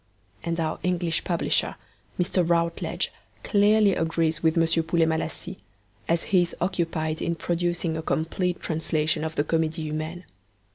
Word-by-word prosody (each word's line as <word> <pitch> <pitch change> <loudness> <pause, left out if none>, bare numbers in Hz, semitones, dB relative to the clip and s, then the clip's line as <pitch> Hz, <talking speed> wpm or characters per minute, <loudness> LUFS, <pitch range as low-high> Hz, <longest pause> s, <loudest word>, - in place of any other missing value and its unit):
And 170 0 -2
our 160 -1 -1
English 175 -2 0
publisher, 170 -3 0 0.4
Mr. 180 0 +2
Routledge, 170 0 0 0.3
clearly 205 0 +4
agrees 165 -1 0
with 160 0 +2
M. 165 0 +3
Poulet 165 0 +2
Malassis, 160 +3 -2 0.5
as 165 0 +2
he 185 -2 +3
is 175 - -2
occupied 165 -3 -1
in 170 - 0
producing 175 -1 -1
a 160 - -2
complete 175 +3 -1
translation 155 -1 0
of 160 0 -3
the 145 - +2
Comedie 160 +1 0
Humaine. 155 +3 -4
165 Hz, 140 wpm, -26 LUFS, 160-175 Hz, 0.5 s, clearly